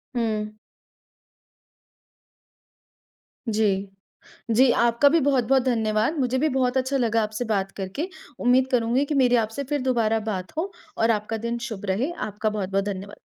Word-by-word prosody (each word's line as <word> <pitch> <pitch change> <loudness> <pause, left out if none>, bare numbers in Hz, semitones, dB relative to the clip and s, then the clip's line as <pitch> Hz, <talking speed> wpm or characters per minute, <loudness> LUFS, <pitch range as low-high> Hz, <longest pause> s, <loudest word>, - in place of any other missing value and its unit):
हुँ। 215 -2 -1 3.0
जी। 200 -3 +1 0.6
जी, 250 +4 +5
आपका 235 +5 +4
भी 330 - +3
बहुत-बहुत 265 -2 +2
धन्यवाद। 225 +3 +1
मुझे 255 -1 +1
भी 310 +3 +2
बहुत 255 -1 +1
अच्छा 260 +1 0
लगा 230 -3 +1
आपसे 215 +3 -3
बात 195 -3 -1
करके। 195 - -3 0.3
उम्मीद 255 +1 +3
करूँगी 245 +2 +2
कि 295 0 -2
मेरी 245 -1 +4
आपसे 225 +6 -4
फिर 290 -2 0
दोबारा 230 -4 +1
बात 185 -2 -5
हो 370 +5 -2 0.3
और 225 +1 +3
आपका 215 +1 -2
दिन 235 0 -2
शुभ 205 -3 -6
रहे। 210 - 0
आपका 215 +1 -2
बहुत-बहुत 195 -2 -1
धन्यवाद। 200 0 -6
230 Hz, 145 wpm, -24 LUFS, 210-260 Hz, 3.0 s, जी